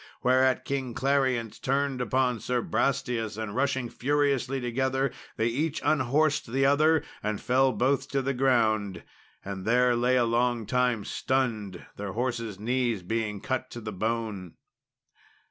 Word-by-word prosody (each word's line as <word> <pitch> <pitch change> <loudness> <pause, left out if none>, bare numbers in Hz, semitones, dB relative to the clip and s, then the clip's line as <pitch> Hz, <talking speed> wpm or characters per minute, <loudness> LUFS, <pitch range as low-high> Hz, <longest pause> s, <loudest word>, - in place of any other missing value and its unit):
Whereat 130 0 +3
King 130 -4 -3
Clarience 130 -5 0
turned 135 -1 0
upon 125 0 +1
Sir 125 +2 -1
Brastias, 115 -2 -1
and 110 -2 -4
rushing 130 -1 0
furiously 135 0 0
together 130 +2 0 0.3
they 110 - +1
each 145 +7 -1
unhorsed 145 -2 +2
the 135 +2 +2
other 155 +3 +4 0.2
and 105 -1 -2
fell 130 +1 +3
both 135 +2 +1
to 135 -1 0
the 135 +1 0
ground, 110 -8 +1 0.4
and 95 -1 -5
there 125 +3 +3
lay 125 +2 +2
a 125 -2 +3
long 120 0 +1
time 125 -2 +1
stunned, 110 -8 -2
their 100 -2 -5
horses' 115 -4 -2
knees 120 -3 0
being 105 0 -2
cut 130 - -2
to 120 - -7
the 110 -2 -6
bone. 110 -3 -3
125 Hz, 145 wpm, -27 LUFS, 110-135 Hz, 0.4 s, other